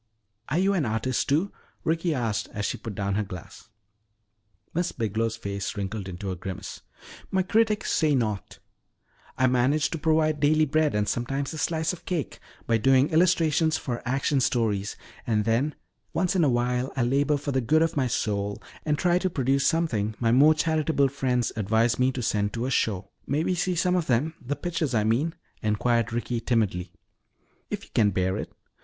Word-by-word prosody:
"Are 150 Hz, -, 0 dB
you 195 Hz, +2 st, +3 dB
an 180 Hz, -6 st, +1 dB
artist, 110 Hz, +3 st, -1 dB
too?" 160 Hz, +8 st, +2 dB, 0.3 s
Ricky 165 Hz, +2 st, 0 dB
asked 115 Hz, -8 st, -1 dB
as 105 Hz, 0 st, -2 dB
she -, -, -2 dB
put 110 Hz, -3 st, -7 dB
down 100 Hz, 0 st, -1 dB
her 105 Hz, -, +1 dB
glass. 90 Hz, -3 st, -10 dB, 1.0 s
Miss 175 Hz, +1 st, 0 dB
Biglow's 115 Hz, 0 st, -1 dB
face 100 Hz, -2 st, -4 dB
wrinkled 100 Hz, 0 st, -4 dB
into 95 Hz, +2 st, -5 dB
a -, -, -3 dB
grimace. 95 Hz, +1 st, -7 dB, 0.5 s
"My 190 Hz, -1 st, +1 dB
critics 215 Hz, +2 st, +1 dB
say 155 Hz, -4 st, +3 dB
not. 110 Hz, -6 st, -2 dB, 0.8 s
I 130 Hz, -, +3 dB
manage 130 Hz, +4 st, +2 dB
to 165 Hz, -, -3 dB
provide 155 Hz, -1 st, +2 dB
daily 155 Hz, +2 st, +4 dB
bread 155 Hz, -1 st, +1 dB
and 105 Hz, 0 st, +1 dB
sometimes 135 Hz, +5 st, -2 dB
a 155 Hz, -, -5 dB
slice 160 Hz, +2 st, 0 dB
of 180 Hz, -, -11 dB
cake 170 Hz, -6 st, -3 dB, 0.3 s
by 115 Hz, -1 st, +2 dB
doing 135 Hz, +4 st, +4 dB
illustrations 160 Hz, -2 st, +3 dB
for 120 Hz, -3 st, -4 dB
action 135 Hz, +3 st, +1 dB
stories. 105 Hz, -5 st, 0 dB, 0.3 s
And 105 Hz, -2 st, +1 dB
then 120 Hz, +7 st, +1 dB, 0.4 s
once 180 Hz, +2 st, +1 dB
in 180 Hz, -, +3 dB
a 145 Hz, -, +4 dB
while 125 Hz, +1 st, 0 dB
I 130 Hz, -, +1 dB
labor 140 Hz, +4 st, +2 dB
for 145 Hz, 0 st, -4 dB
the 130 Hz, -1 st, +1 dB
good 155 Hz, +7 st, +3 dB
of 165 Hz, -, -1 dB
my 135 Hz, -3 st, +1 dB
soul 100 Hz, -3 st, -1 dB, 0.2 s
and 150 Hz, -1 st, 0 dB
try 175 Hz, +1 st, +2 dB
to 185 Hz, -, 0 dB
produce 135 Hz, -3 st, +1 dB
something 115 Hz, -11 st, 0 dB
my 115 Hz, -1 st, +2 dB
more 145 Hz, +6 st, +6 dB
charitable 155 Hz, -3 st, +1 dB
friends 125 Hz, -3 st, 0 dB
advise 110 Hz, +3 st, +1 dB
me 130 Hz, +1 st, +3 dB
to 125 Hz, -, -4 dB
send 105 Hz, -2 st, 0 dB
to 120 Hz, +1 st, -2 dB
a 130 Hz, -, -2 dB
show." 100 Hz, -6 st, 0 dB, 0.2 s
"May 145 Hz, +3 st, +1 dB
may -, -, 0 dB
we -, -, +2 dB
see 180 Hz, +1 st, 0 dB
some 180 Hz, +1 st, +2 dB
of 175 Hz, -3 st, 0 dB
them 135 Hz, +6 st, +1 dB
the 140 Hz, +4 st, -2 dB
pictures, 165 Hz, -7 st, -2 dB
I 110 Hz, -, +3 dB
mean?" 125 Hz, +10 st, +1 dB, 0.3 s
inquired 115 Hz, +2 st, +1 dB
Ricky 120 Hz, 0 st, -2 dB
timidly. 105 Hz, -7 st, 0 dB, 0.8 s
"If -, -, -4 dB
you -, -, -16 dB
can 105 Hz, -2 st, +4 dB
bear 95 Hz, 0 st, 0 dB
it. -, -, -5 dB
130 Hz, 190 wpm, -26 LUFS, 110-155 Hz, 1.0 s, more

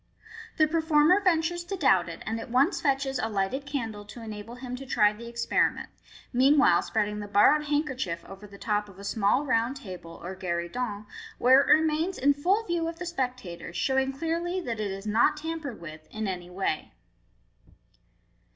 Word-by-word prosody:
The 310 Hz, -, +6 dB
performer 320 Hz, +3 st, +4 dB
ventures 345 Hz, -2 st, +1 dB
to 390 Hz, +2 st, -4 dB
doubt 190 Hz, -, +3 dB
it, 170 Hz, -, -8 dB
and 225 Hz, +1 st, -2 dB
at 225 Hz, -, -8 dB
once 265 Hz, +8 st, +2 dB
fetches 270 Hz, -1 st, 0 dB
a 225 Hz, -, -1 dB
lighted 215 Hz, +7 st, -2 dB
candle 225 Hz, -7 st, -4 dB
to 230 Hz, +3 st, -10 dB
enable 215 Hz, +1 st, -7 dB
him 250 Hz, 0 st, -6 dB
to 270 Hz, -, -8 dB
try 210 Hz, -3 st, +3 dB
the 235 Hz, +2 st, -10 dB
experiment, 235 Hz, 0 st, 0 dB, 0.4 s
meanwhile 265 Hz, -7 st, +5 dB
spreading 210 Hz, -1 st, -1 dB
the 205 Hz, -, -6 dB
borrowed 215 Hz, +9 st, +4 dB
handkerchief 265 Hz, -, -2 dB
over 195 Hz, +2 st, -11 dB
the 200 Hz, 0 st, -13 dB
top 210 Hz, 0 st, -1 dB
of 190 Hz, -, -15 dB
a 200 Hz, -, -10 dB
small 215 Hz, +7 st, +1 dB
round 240 Hz, +1 st, +1 dB
table, 180 Hz, -9 st, -9 dB
or 185 Hz, +2 st, -5 dB
gueridon, 190 Hz, +5 st, -3 dB, 0.3 s
where 260 Hz, +2 st, +6 dB
it -, -, -2 dB
remains 320 Hz, +4 st, +3 dB
in 285 Hz, +2 st, +4 dB
full 370 Hz, +10 st, +1 dB
view 340 Hz, -3 st, -1 dB
of 330 Hz, 0 st, -5 dB
the 360 Hz, -, -5 dB
spectators, 250 Hz, -, -4 dB
showing 265 Hz, +7 st, +1 dB
clearly 335 Hz, +5 st, -2 dB
that 235 Hz, -10 st, -4 dB
it 210 Hz, -1 st, -1 dB
is 195 Hz, +1 st, -6 dB
noi 215 Hz, +2 st, +3 dB
tampered 310 Hz, -5 st, -5 dB
with 155 Hz, -2 st, -10 dB
in 215 Hz, -1 st, -4 dB
any 180 Hz, -2 st, -5 dB
way. 180 Hz, -4 st, -3 dB
245 Hz, 180 wpm, -27 LUFS, 205-300 Hz, 0.4 s, The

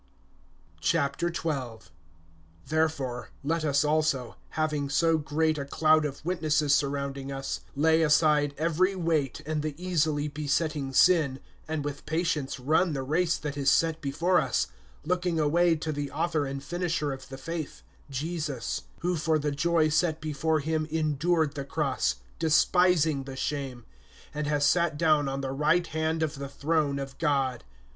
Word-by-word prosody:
XII. 160 Hz, +1 st, +1 dB, 1.4 s
THEREFORE, 155 Hz, -6 st, -1 dB
let 160 Hz, +3 st, 0 dB
us 145 Hz, -1 st, +2 dB
also, 150 Hz, -5 st, 0 dB
having 150 Hz, -3 st, -1 dB
so 165 Hz, +2 st, +3 dB
great 155 Hz, +1 st, 0 dB
a 140 Hz, -, -3 dB
cloud 155 Hz, +2 st, +3 dB
of 145 Hz, +1 st, -6 dB
witnesses 155 Hz, -4 st, +1 dB
surrounding, 140 Hz, -1 st, -1 dB
us, 135 Hz, 0 st, -4 dB, 0.2 s
lay 160 Hz, +3 st, +3 dB
aside 150 Hz, -2 st, +3 dB
every 170 Hz, +5 st, +1 dB
weight, 160 Hz, -7 st, -1 dB
and 155 Hz, 0 st, -1 dB
the 150 Hz, -1 st, -3 dB
easily 160 Hz, -4 st, 0 dB
besetting 150 Hz, -1 st, -1 dB
sin, 150 Hz, -2 st, +4 dB, 0.3 s
and 155 Hz, -2 st, -3 dB
with 145 Hz, -1 st, -6 dB
patience 160 Hz, -5 st, -1 dB
run 155 Hz, +6 st, +2 dB
the 135 Hz, -2 st, -2 dB
race 165 Hz, +5 st, +1 dB
that 150 Hz, -2 st, -5 dB
is 140 Hz, -1 st, +2 dB
set 160 Hz, +2 st, +2 dB
before 170 Hz, +6 st, +2 dB
us, 90 Hz, -, 0 dB, 0.4 s
(2)looking 180 Hz, -1 st, 0 dB
away 165 Hz, +3 st, +3 dB
to 155 Hz, 0 st, -3 dB
the 145 Hz, -1 st, -3 dB
author 155 Hz, -3 st, -1 dB
and 135 Hz, 0 st, -5 dB
finisher 165 Hz, -2 st, -1 dB
of 135 Hz, -, -10 dB
the 135 Hz, -, -7 dB
faith, 160 Hz, +2 st, -6 dB, 0.3 s
Jesus; 150 Hz, -2 st, -3 dB, 0.2 s
who 180 Hz, +1 st, 0 dB
for 160 Hz, 0 st, +1 dB
the 150 Hz, -1 st, -1 dB
joy 160 Hz, +2 st, +2 dB
set 155 Hz, +1 st, +1 dB
before 155 Hz, +1 st, 0 dB
him 155 Hz, +1 st, -1 dB
endured 155 Hz, 0 st, +1 dB
the 140 Hz, -2 st, -4 dB
cross, 140 Hz, -1 st, 0 dB, 0.2 s
despising 160 Hz, -2 st, +3 dB
the 135 Hz, -1 st, -7 dB
shame, 130 Hz, -3 st, -4 dB, 0.5 s
and 150 Hz, 0 st, -3 dB
has 145 Hz, -1 st, +2 dB
sat 170 Hz, 0 st, +2 dB
down 155 Hz, -3 st, +3 dB
on 135 Hz, 0 st, -3 dB
the 135 Hz, -1 st, -3 dB
right 155 Hz, +5 st, +2 dB
hand 160 Hz, 0 st, -1 dB
of 145 Hz, -3 st, -3 dB
the 140 Hz, -1 st, -5 dB
throne 150 Hz, -1 st, 0 dB
of 135 Hz, -1 st, -6 dB
God. 135 Hz, -6 st, 0 dB
150 Hz, 150 wpm, -28 LUFS, 140-160 Hz, 1.4 s, sin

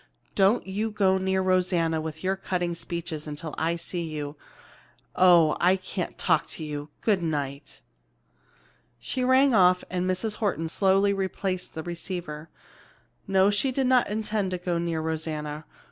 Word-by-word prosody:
Don't 200 Hz, +4 st, +3 dB
you 205 Hz, +4 st, -2 dB
go 195 Hz, -3 st, +2 dB
near 190 Hz, 0 st, 0 dB
Rosanna 180 Hz, -3 st, +1 dB
with 160 Hz, +1 st, -6 dB
your 190 Hz, +1 st, +1 dB
cutting 180 Hz, -2 st, -2 dB
speeches 165 Hz, -2 st, -5 dB
until 150 Hz, +1 st, -6 dB
I 165 Hz, +1 st, 0 dB
see 170 Hz, +1 st, -4 dB
you. 150 Hz, -3 st, -5 dB, 0.8 s
Oh, 170 Hz, -4 st, +6 dB
I 180 Hz, +2 st, +4 dB
can't 185 Hz, -1 st, -5 dB
talk -, -, +2 dB
to 160 Hz, -, -6 dB
you! 150 Hz, -1 st, -5 dB
Good 205 Hz, -5 st, +2 dB
night!" 145 Hz, -3 st, -4 dB, 1.2 s
She 255 Hz, -, -2 dB
rang 260 Hz, +1 st, +5 dB
off 180 Hz, -3 st, +5 dB
and 185 Hz, 0 st, -1 dB
Mrs. 205 Hz, +4 st, -1 dB
Horton 170 Hz, -7 st, -1 dB
slowly 195 Hz, +3 st, +3 dB
replaced 190 Hz, -1 st, -3 dB
the 160 Hz, -, -4 dB
receiver. 170 Hz, -2 st, -6 dB, 0.8 s
No, 195 Hz, +1 st, +4 dB
she 235 Hz, +6 st, +1 dB
did 265 Hz, +1 st, 0 dB
not 250 Hz, -3 st, +3 dB
intend 210 Hz, -2 st, -1 dB
to 185 Hz, -, -2 dB
go 175 Hz, -1 st, -2 dB
near 170 Hz, -2 st, -1 dB
Rosanna. 155 Hz, -1 st, -4 dB
180 Hz, 150 wpm, -26 LUFS, 160-195 Hz, 1.2 s, Oh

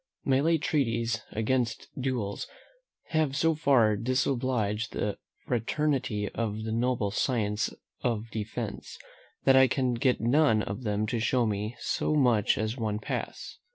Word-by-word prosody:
My 135 Hz, -1 st, +3 dB
late 160 Hz, +1 st, +2 dB
treatises 115 Hz, -5 st, 0 dB
against 115 Hz, +1 st, -1 dB
duels 125 Hz, -6 st, -2 dB, 0.6 s
have 155 Hz, -4 st, +1 dB
so 165 Hz, +1 st, +3 dB
far 130 Hz, -8 st, +4 dB
disobliged 120 Hz, -2 st, 0 dB
the 105 Hz, -1 st, -2 dB, 0.3 s
fraternity 125 Hz, -3 st, 0 dB
of 110 Hz, -2 st, -3 dB
the 110 Hz, -, -3 dB
noble 115 Hz, -3 st, 0 dB
science 105 Hz, -2 st, 0 dB, 0.3 s
of 115 Hz, -2 st, -2 dB
defence, 110 Hz, 0 st, -5 dB, 0.5 s
that 135 Hz, -, +5 dB
I 130 Hz, 0 st, +7 dB
can 130 Hz, -1 st, 0 dB
get 125 Hz, +1 st, +1 dB
none 120 Hz, -2 st, +3 dB
of 100 Hz, +5 st, -5 dB
them 105 Hz, -2 st, 0 dB
to 115 Hz, +2 st, -1 dB
show 120 Hz, +2 st, +2 dB
me 105 Hz, +2 st, -2 dB
so 155 Hz, -, 0 dB
much 120 Hz, -8 st, +3 dB
as 110 Hz, +3 st, -2 dB
one 110 Hz, -3 st, -1 dB
pass. 110 Hz, -, -5 dB
115 Hz, 140 wpm, -28 LUFS, 110-130 Hz, 0.6 s, I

